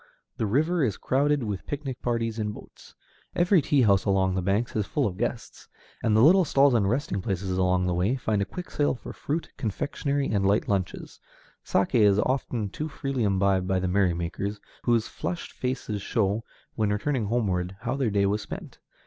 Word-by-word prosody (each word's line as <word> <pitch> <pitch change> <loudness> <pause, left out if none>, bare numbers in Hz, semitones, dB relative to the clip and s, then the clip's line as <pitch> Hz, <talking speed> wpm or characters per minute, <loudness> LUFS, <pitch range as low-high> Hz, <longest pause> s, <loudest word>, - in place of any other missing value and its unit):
The 110 - 0
river 155 - +2
is 110 -7 0
crowded 140 +1 +1
with 105 -4 -4
picnic 135 -3 -5
parties 115 -2 -1
in 105 -1 -2
boats. - - -14 0.4
Every 175 0 +4
tea 140 -1 +3
house 100 -3 +4
along 95 -1 +2
the 95 - 0
banks 100 +6 0
is 105 -2 0
full 145 - 0
of 95 - -2
guests, 120 +2 -4 0.3
and 110 -1 +2
the 110 - +6
little 185 +6 +7
stalls 140 -3 +4
and 105 -5 +2
resting 110 -5 -1
places 95 -1 -2
on 90 0 +2
the 90 - 0
way 95 +8 +1
find 110 -5 -1
a - - +1
quick 180 - -8
sale 145 -1 +1
for - - -9
fruit, 160 +3 -3
confectionery, 140 +5 -2
and 100 -2 0
light 100 +2 +2
lunches. 95 -3 -3 0.4
Saké 100 +5 +1
is 100 -2 +5
often 120 -3 -1
too 155 +7 -4
freely 135 -3 -3
imbibed 95 -2 +2
by 95 -1 +1
the 95 0 0
merrymakers, 95 +2 0 0.3
whose 115 -2 +2
flushed 175 - -5
faces 125 -5 -3
show, 105 +1 0 0.3
when 110 -2 0
returning 115 +3 0
homeward, 95 -5 -1
how 120 +3 -2
their 135 -4 0
day 100 -1 +2
was 105 +2 0
spent. - - -8
110 Hz, 190 wpm, -26 LUFS, 95-135 Hz, 0.4 s, little